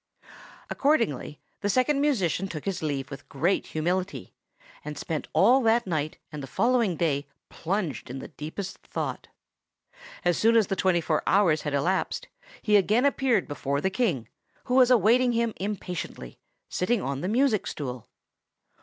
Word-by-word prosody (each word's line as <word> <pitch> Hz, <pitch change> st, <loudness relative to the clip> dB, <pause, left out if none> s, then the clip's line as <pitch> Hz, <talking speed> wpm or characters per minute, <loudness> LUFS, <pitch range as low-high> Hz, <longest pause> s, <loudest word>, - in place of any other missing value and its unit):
Accordingly 230 Hz, -, 0 dB, 0.2 s
the 205 Hz, -, -1 dB
Second 275 Hz, +5 st, +2 dB
Musician 195 Hz, -, +1 dB
took 155 Hz, -5 st, -7 dB
his 195 Hz, -2 st, -2 dB
leave 145 Hz, -3 st, -3 dB
with 140 Hz, 0 st, -9 dB
great 170 Hz, +8 st, 0 dB
humility, 180 Hz, +5 st, -2 dB, 0.5 s
and 150 Hz, -1 st, -6 dB
spent 155 Hz, 0 st, -4 dB
all 260 Hz, +3 st, +5 dB
that 230 Hz, 0 st, +3 dB
night 155 Hz, -4 st, -2 dB
and 150 Hz, -2 st, -6 dB
the 135 Hz, -, -7 dB
following 230 Hz, -, +2 dB
day 150 Hz, -4 st, 0 dB, 0.2 s
plunged 180 Hz, -6 st, -3 dB
in 130 Hz, -, -5 dB
the -, -, -8 dB
deepest 180 Hz, +6 st, -6 dB
thought. -, -, -5 dB, 1.0 s
As 175 Hz, -2 st, +2 dB
soon 230 Hz, +1 st, +5 dB
as 220 Hz, -, +5 dB
the 195 Hz, -, -2 dB
twenty 185 Hz, -3 st, +2 dB
four 155 Hz, -1 st, 0 dB
hours 180 Hz, -6 st, +4 dB
had 150 Hz, -2 st, -2 dB
elapsed 180 Hz, +7 st, -1 dB, 0.3 s
he 210 Hz, -2 st, +5 dB
again 215 Hz, +6 st, +3 dB
appeared 265 Hz, -8 st, +2 dB
before 140 Hz, -1 st, -2 dB
the 190 Hz, +6 st, 0 dB
King, 185 Hz, -, 0 dB, 0.4 s
who 250 Hz, -, -3 dB
was 255 Hz, -1 st, +6 dB
awaiting 245 Hz, +1 st, +4 dB
him 230 Hz, -1 st, 0 dB
impatiently, 180 Hz, -, -5 dB, 0.3 s
sitting 225 Hz, +6 st, 0 dB
on 135 Hz, 0 st, -3 dB
the 180 Hz, -, -2 dB
music 230 Hz, 0 st, +2 dB
stool. 125 Hz, -5 st, -6 dB
185 Hz, 155 wpm, -27 LUFS, 150-230 Hz, 1.0 s, was